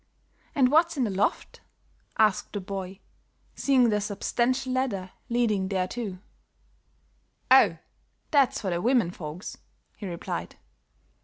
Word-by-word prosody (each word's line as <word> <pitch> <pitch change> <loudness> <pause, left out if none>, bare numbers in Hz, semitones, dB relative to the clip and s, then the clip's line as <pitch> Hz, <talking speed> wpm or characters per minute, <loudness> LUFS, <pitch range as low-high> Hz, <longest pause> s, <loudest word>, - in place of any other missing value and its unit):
"And 260 -3 +4
what's 325 +1 +4
in 265 - +2
the 215 - 0
loft?" 195 +2 -1 0.6
asked 215 -3 +2
the 205 - -2
boy, 190 -1 -6 0.5
seeing 260 -4 +3
the 210 -1 +1
substantial 245 +5 -1
ladder 205 -8 -1 0.2
leading 220 -5 +1
thereto. 195 +1 -2 1.3
"Oh, - - +7 0.5
that's 280 -4 +3
for 195 -4 -2
the 170 0 -1
women 235 -6 +2
folks," 165 +1 -7 0.4
he 205 - -6
replied. 170 -2 -5
210 Hz, 120 wpm, -27 LUFS, 190-255 Hz, 1.3 s, Oh